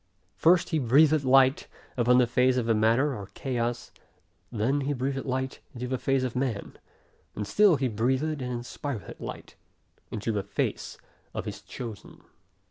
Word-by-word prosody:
First 175 +1 +4
he 160 - +1
breathed 145 +4 +4
light, 130 0 +4 0.3
upon 125 0 +4
the 125 - +5
face 125 +1 +2
of 125 - 0
the 115 - +3
matter 115 +6 +2
or 100 -3 -7
chaos; 120 -2 -3 0.6
then 125 +6 0
he 140 +2 -1
breathed 135 +1 -2
light, 130 0 -2 0.2
into 125 +1 -4
the 130 0 -2
face 135 -1 +1
of 130 -1 -3
man; 125 -5 -3 0.6
and 105 - -3
still 200 - +5
he 135 -2 0
breatheth 130 +7 0
and 125 0 -3
inspireth 120 0 -6
light, - - -8 0.6
into 110 +2 -3
the 105 -2 -1
face - - -3 0.4
of - - -3
his - - -6
chosen. 115 -5 -9
130 Hz, 160 wpm, -27 LUFS, 120-135 Hz, 0.6 s, the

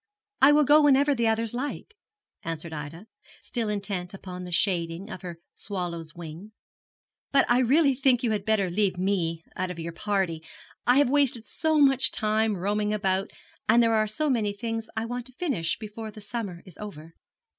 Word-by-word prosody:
'I 275 +2 +8
will 300 0 +5
go 295 +2 +6
whenever 285 0 +4
the 235 -3 +1
others 225 0 0
like,' 290 - -5 0.5
answered 165 0 -5
Ida, 155 +5 -7 0.3
still 230 -3 -3
intent 195 -3 -3
upon 180 -1 -8
the 180 - -8
shading 175 +2 0
of - - -7
her 175 -3 -7 0.2
swallow's 175 -5 -5
wing; 170 +5 -9 0.8
'but 275 -1 +5
I 240 +1 +4
really 275 +3 +4
think 260 -1 +2
you 235 - +1
had 210 -2 -1
better 205 -4 +1
leave 195 -1 +1
me 175 -4 -1
out 185 0 -2
of 180 - -6
your 170 0 -5
party 185 -3 -1 0.5
I 245 +2 +5
have 280 -3 +4
wasted 275 -5 +3
so 315 -1 0
much 270 -2 +5
time 215 -1 0
roaming 210 +3 0
about 195 -1 0 0.4
and 235 +2 +6
there 230 0 +3
are 215 -1 +2
so 305 +9 -1
many 220 -7 +1
things 225 +1 -4
I 220 - -1
want 245 +1 -5
to 255 - -14
finish 245 - -1
before 220 0 -7
the 215 - -11
summer 205 -4 -5
is 185 -6 -14
over.' 165 -6 -9
210 Hz, 185 wpm, -26 LUFS, 180-245 Hz, 0.8 s, I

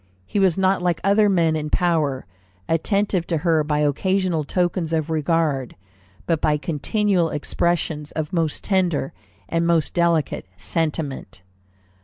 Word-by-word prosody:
He 205 - -2
was 190 -3 +3
not 190 0 +2
like 175 -2 0
other 205 +1 +4
men 165 -4 +2
in 155 -1 -3
power, 155 -7 0 0.4
attentive 190 +1 0
to 165 - 0
her 160 -1 +2
by 150 0 0
occasional 180 +3 +1
tokens 175 +1 -1
of 160 0 -1
regard, 155 -4 0 0.5
but 165 -2 0
by 150 -1 +2
continual 175 +4 0
expressions 150 0 -2
of 155 +3 -4
most 165 -3 -1
tender 180 -8 0 0.3
and 165 +7 0
most 165 -3 +1
delicate 170 - +1
sentiment." 150 - -3
165 Hz, 135 wpm, -22 LUFS, 150-180 Hz, 0.5 s, other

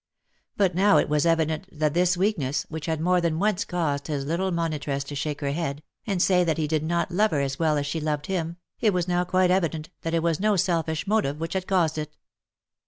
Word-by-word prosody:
But 195 -3 +3
now 200 +4 +4
it - - +2
was 150 +2 +2
evident 160 +2 +1
that 150 -1 0
this 180 +1 +2
weakness, 165 -8 0
which 160 0 -6
had 160 -1 -1
more 180 +2 +2
than 165 -2 0
once 205 +1 +1
caused 150 -6 -2
his 145 -3 -2
little 170 +6 0
monitress 155 -5 -2
to 140 - -8
shake 145 +1 -3
her 140 -1 -1
head, 145 -2 -3 0.2
and 195 -4 0
say 180 0 +4
that 165 -2 0
he 155 -2 0
did 155 0 0
not 170 +3 -1
love 210 +5 +3
her 145 -6 0
as 135 0 -2
well 155 -2 +2
as 145 - -1
she 155 +2 -3
loved 150 -1 -2
him, 170 -3 -3 0.2
it 215 -4 +3
was 180 -1 0
now 180 0 +1
quite 185 0 +2
evident 165 -3 0
that 165 0 -2
it 165 - +1
was 165 -2 +1
no 210 +1 +2
selfish 165 -3 0
motive 195 -9 0
which 165 +1 -3
had 190 -1 -2
caused 165 -5 +1
it. 150 0 -6
165 Hz, 235 wpm, -25 LUFS, 150-180 Hz, 0.2 s, now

